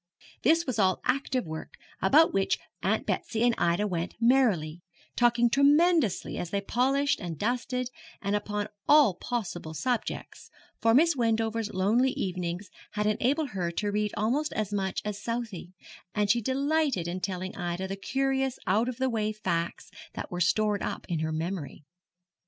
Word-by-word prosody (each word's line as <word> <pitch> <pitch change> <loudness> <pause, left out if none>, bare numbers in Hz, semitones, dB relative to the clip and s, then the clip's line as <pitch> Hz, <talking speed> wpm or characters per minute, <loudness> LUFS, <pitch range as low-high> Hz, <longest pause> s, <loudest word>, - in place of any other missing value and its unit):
This 330 +5 +3
was 250 -4 -2
all 185 -2 +3
active 260 -3 0
work, 160 0 -7 0.3
about 305 +12 +5
which 195 0 +1 0.2
Aunt - - 0
Betsy 225 0 -1
and 240 -1 +4
Ida 175 +4 +2
went 175 -3 -3
merrily, 215 -11 +2 0.3
talking 240 0 +4
tremendously 290 - +3
as 175 - -4
they 200 - 0
polished 265 +7 +1
and 170 -3 -5
dusted, 250 - -1 0.3
and 200 +1 -1
upon 210 0 -2 0.2
all 290 -9 +7
possible 175 -7 -4
subjects, 245 +6 -3 0.3
for 225 0 +4
Miss 330 +3 +5
Wendover's 225 -2 0
lonely 225 +8 +2
evenings 180 0 -3 0.2
had 210 0 -1
enabled 265 +8 +1
her 185 -5 -2
to 205 +3 -1
read 210 0 0
almost 255 +9 0
as 210 -1 -2
much 190 -2 -1
as 210 0 -4
Southey, 225 -6 -4 0.4
and 205 -1 +3
she 235 - +2
delighted 275 - 0
in 175 +2 -3
telling 185 +1 -4
Ida 175 +2 -3
the 195 - -4
curious 265 +4 -1
out 220 +6 +2
of 250 - -5
the 260 0 +1
way 215 -3 0
facts 175 -5 -3 0.2
that - - -6
were 175 0 -3
stored 210 +3 +2
up - - -4
in 170 -3 -1
her 160 0 -1
memory. 160 -2 -4
215 Hz, 160 wpm, -28 LUFS, 185-255 Hz, 0.4 s, all